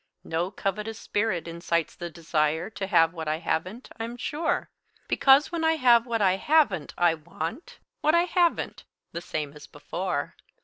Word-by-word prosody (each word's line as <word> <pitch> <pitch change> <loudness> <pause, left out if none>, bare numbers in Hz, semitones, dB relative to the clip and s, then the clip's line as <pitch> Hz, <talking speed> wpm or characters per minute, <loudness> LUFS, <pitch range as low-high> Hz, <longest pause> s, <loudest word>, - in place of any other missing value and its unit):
No 165 +3 -1
covetous 210 +3 -3
spirit 200 -6 -1
incites 170 -1 -1
the 175 - -6
desire 160 +2 -1
To 195 -3 -4
have 165 -3 +4
what 160 -2 -6
I 155 +1 0
haven't, 180 +8 -3
I'm 230 +2 -5
sure; 305 +6 -2 0.4
Because 275 +2 +5
when 335 -1 -2
I 320 0 +4
have 245 -5 +4
what 230 -3 0
I 190 -1 +3
haven't, 295 - +2
I 175 -1 +4
want 170 - -6 0.2
What 310 +2 +3
I 340 - +5
haven't, 350 -1 0 0.3
the 170 - -5
same 150 -4 -4
as 150 -1 -12
before. 170 +1 -4
185 Hz, 165 wpm, -26 LUFS, 165-245 Hz, 0.4 s, Because